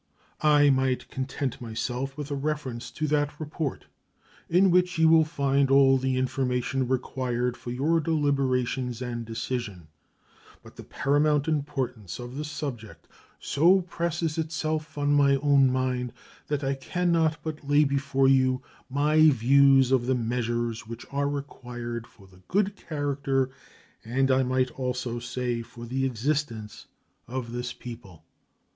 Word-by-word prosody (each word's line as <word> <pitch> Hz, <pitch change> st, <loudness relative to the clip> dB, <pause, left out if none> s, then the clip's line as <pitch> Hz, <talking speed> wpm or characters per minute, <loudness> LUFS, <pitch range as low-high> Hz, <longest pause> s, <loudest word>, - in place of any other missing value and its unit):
I 145 Hz, -1 st, +5 dB
might 130 Hz, -1 st, 0 dB
content 130 Hz, 0 st, -4 dB
myself 125 Hz, +4 st, -4 dB
with 145 Hz, -1 st, -6 dB
a -, -, 0 dB
reference 135 Hz, -5 st, -3 dB
to 155 Hz, +6 st, -3 dB
that 145 Hz, 0 st, 0 dB
report, 155 Hz, -2 st, -4 dB, 0.6 s
in 180 Hz, +2 st, +4 dB
which 180 Hz, 0 st, +2 dB
you 160 Hz, 0 st, +5 dB
will 160 Hz, 0 st, +6 dB
find 140 Hz, -3 st, +1 dB
all 135 Hz, -1 st, +5 dB
the 130 Hz, 0 st, 0 dB
information 130 Hz, 0 st, -1 dB
required 125 Hz, -1 st, -1 dB
for 120 Hz, -, -9 dB
your 145 Hz, +7 st, +1 dB
deliberations 135 Hz, -5 st, 0 dB
and 120 Hz, -2 st, -4 dB
decision, 115 Hz, -6 st, -5 dB, 0.7 s
but -, -, -15 dB
the -, -, -10 dB
paramount 145 Hz, +2 st, +1 dB
importance 135 Hz, -, -2 dB
of 120 Hz, +1 st, -8 dB
the 150 Hz, -, -3 dB
subject 140 Hz, -7 st, -6 dB, 0.3 s
so 175 Hz, +6 st, +4 dB
presses 170 Hz, -2 st, -2 dB
itself 155 Hz, -1 st, -3 dB
on 145 Hz, 0 st, +1 dB
my 140 Hz, -1 st, +5 dB
own 135 Hz, -1 st, +4 dB
mind 125 Hz, -1 st, -1 dB, 0.3 s
that 145 Hz, -1 st, -2 dB
I 135 Hz, 0 st, +1 dB
can 175 Hz, +6 st, -1 dB
not 160 Hz, -2 st, +2 dB
but 155 Hz, -2 st, -6 dB
lay 145 Hz, +1 st, +5 dB
before 135 Hz, -1 st, +1 dB
you 130 Hz, -1 st, +3 dB, 0.3 s
my 150 Hz, +3 st, +4 dB
views 135 Hz, +1 st, +5 dB
of 125 Hz, -2 st, +2 dB
the 130 Hz, -, +2 dB
measures 120 Hz, -1 st, -2 dB
which 115 Hz, +1 st, -8 dB
are 140 Hz, 0 st, 0 dB
required 120 Hz, -4 st, -6 dB
for 100 Hz, -, -19 dB
the 95 Hz, -1 st, -20 dB
good 205 Hz, +1 st, +1 dB
character, 140 Hz, -5 st, -1 dB, 0.5 s
and 135 Hz, +4 st, +1 dB
I 130 Hz, 0 st, +4 dB
might 130 Hz, 0 st, +1 dB
almost 125 Hz, -2 st, -4 dB
say 125 Hz, -2 st, -1 dB
for 120 Hz, 0 st, -10 dB
the 135 Hz, +3 st, -1 dB
existence, 120 Hz, -3 st, -3 dB, 0.4 s
of 120 Hz, -1 st, -5 dB
this 120 Hz, +1 st, -4 dB
people. 115 Hz, -9 st, -11 dB
135 Hz, 145 wpm, -27 LUFS, 125-145 Hz, 0.7 s, will